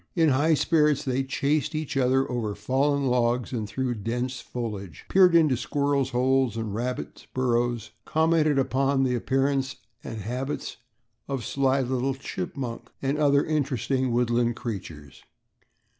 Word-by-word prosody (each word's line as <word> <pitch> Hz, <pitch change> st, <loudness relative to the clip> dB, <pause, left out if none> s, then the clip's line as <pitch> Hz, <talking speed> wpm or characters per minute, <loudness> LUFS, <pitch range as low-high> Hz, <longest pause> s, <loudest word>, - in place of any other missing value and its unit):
In 165 Hz, -3 st, +4 dB
high 145 Hz, +4 st, +3 dB
spirits, 150 Hz, -2 st, +2 dB
they 130 Hz, 0 st, 0 dB
chased 140 Hz, +3 st, 0 dB
each 155 Hz, -2 st, -3 dB
other 130 Hz, 0 st, +2 dB
over 110 Hz, -4 st, -2 dB
fallen 140 Hz, +6 st, +1 dB
logs 125 Hz, -1 st, +1 dB
and 110 Hz, -4 st, -3 dB
through 130 Hz, +2 st, -2 dB
the 110 Hz, -, -8 dB
dense 120 Hz, +4 st, -2 dB
foliage, 105 Hz, -, -6 dB
peered 185 Hz, -2 st, +6 dB
into 155 Hz, -5 st, +5 dB
squirrels' 140 Hz, +1 st, 0 dB
holes 130 Hz, -1 st, +1 dB
and 110 Hz, -3 st, -3 dB
rabbits' 125 Hz, +4 st, -4 dB
burrows, 120 Hz, -3 st, 0 dB
commented 160 Hz, -2 st, +2 dB
upon 135 Hz, +1 st, +2 dB
the 130 Hz, -1 st, +1 dB
appearance 135 Hz, +2 st, 0 dB, 0.3 s
and 110 Hz, -, -6 dB
habits 125 Hz, +7 st, -4 dB, 0.5 s
of 135 Hz, -2 st, -2 dB
the -, -, -8 dB
sly 135 Hz, 0 st, +1 dB
little 130 Hz, +1 st, -1 dB
chipmunk 125 Hz, 0 st, -5 dB
and 140 Hz, +2 st, 0 dB
other 145 Hz, -1 st, +4 dB
interesting, 135 Hz, -3 st, 0 dB
woodland 120 Hz, 0 st, +1 dB
creatures. 80 Hz, -, -7 dB
130 Hz, 145 wpm, -26 LUFS, 120-140 Hz, 0.5 s, peered